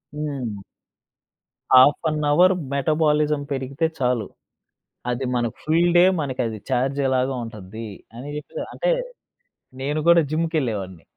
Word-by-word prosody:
హ్మ్. 130 -9 -4 1.2
Of 145 +2 +5
an 150 0 -2
hour 180 +4 +5 0.2
metabolism 150 +1 +1
పెరిగితే 135 +3 -2
చాలు. 125 -5 0 0.8
అది 125 +2 -2
మనకు 120 -2 -1
ఫుల్ 170 +3 +3
డే 175 - +7 0.2
మనకది 120 -6 -3
ఛార్జేలాగా 130 0 +1
ఉంటద్ది. 110 0 -8 0.3
అని 130 +5 -8
జెప్పి 315 - -6
అంటే - - 0 0.9
నేను 145 +3 -1
కూడా 170 0 +7
జిమ్‌కెళ్ళేవాడిని. 120 - -2
135 Hz, 105 wpm, -23 LUFS, 120-155 Hz, 1.2 s, డే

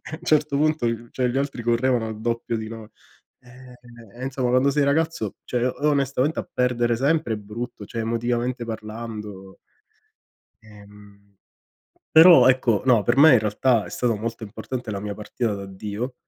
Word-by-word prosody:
a 155 - -9
un - - -10
certo 150 -2 +1
punto 155 -3 +1 0.2
cioè 130 - -1
gli 125 +1 -2
altri 135 -4 -3
correvano 120 0 +1
al 110 -1 -7
doppio 115 0 -2
di 110 0 -5
noi. 110 -1 -9 0.5
Eh 125 0 -15 0.4
e - - -6
insomma, 130 -1 -2
quando 130 +3 +3
sei 145 +1 +1
ragazzo, 145 - 0
cioè 125 -1 -2
o 150 +4 -1
onestamente 140 +1 0
a - - -7
perdere 120 -1 +1
sempre 140 0 0
è - - -6
brutto, 105 +2 -7
cioè 115 +3 -5
emotivamente 120 +2 -2
parlando. 110 -3 -8 1.0
Ehm. 105 -1 -17 0.9
Però 165 0 +8
ecco, 125 -5 +2
no, 120 -5 +4
per 120 +5 +1
me 145 0 +8
in - - +6
realtà 110 +2 +1
è - - -10
stato 120 -3 -1
molto 115 +2 -5
importante 110 +3 -6
la 100 - -3
mia 100 +1 -5
partita 110 +1 -3
di 100 - -7
addio 105 +6 -6
120 Hz, 170 wpm, -23 LUFS, 110-130 Hz, 1.0 s, Però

